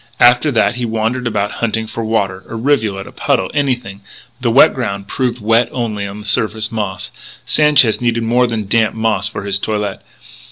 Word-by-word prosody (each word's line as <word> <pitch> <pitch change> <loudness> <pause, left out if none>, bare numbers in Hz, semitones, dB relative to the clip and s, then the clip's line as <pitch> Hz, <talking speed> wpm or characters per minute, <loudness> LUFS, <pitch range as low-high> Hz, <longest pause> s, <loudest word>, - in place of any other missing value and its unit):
After 125 +5 +5
that 115 +1 +2
he 125 - -3
wandered 115 +2 -1
about 105 -2 -1
hunting 110 -1 0
for 115 +1 -5
water 100 -4 -1
a - - -6
rivulet, 110 -6 0
a - - -11
puddle, 95 - 0
anything. 125 -9 -2 0.4
But - - -28
the 120 - +1
wet 120 +4 +6
ground 100 -6 -4
proved 125 +1 -2
wet 115 +2 +2
only 110 -5 -3
on 100 +2 -8
the - - -12
surface 110 +1 -1
moss. 105 -4 -4 0.3
Sanchez 145 -8 +4
needed 115 -1 0
more 120 +2 +2
than 110 -3 -3
damp 110 +2 +1
moss 110 -3 0
for 105 - -6
his 100 -1 0
toilet. 105 -1 -3
110 Hz, 190 wpm, -16 LUFS, 105-120 Hz, 0.4 s, wet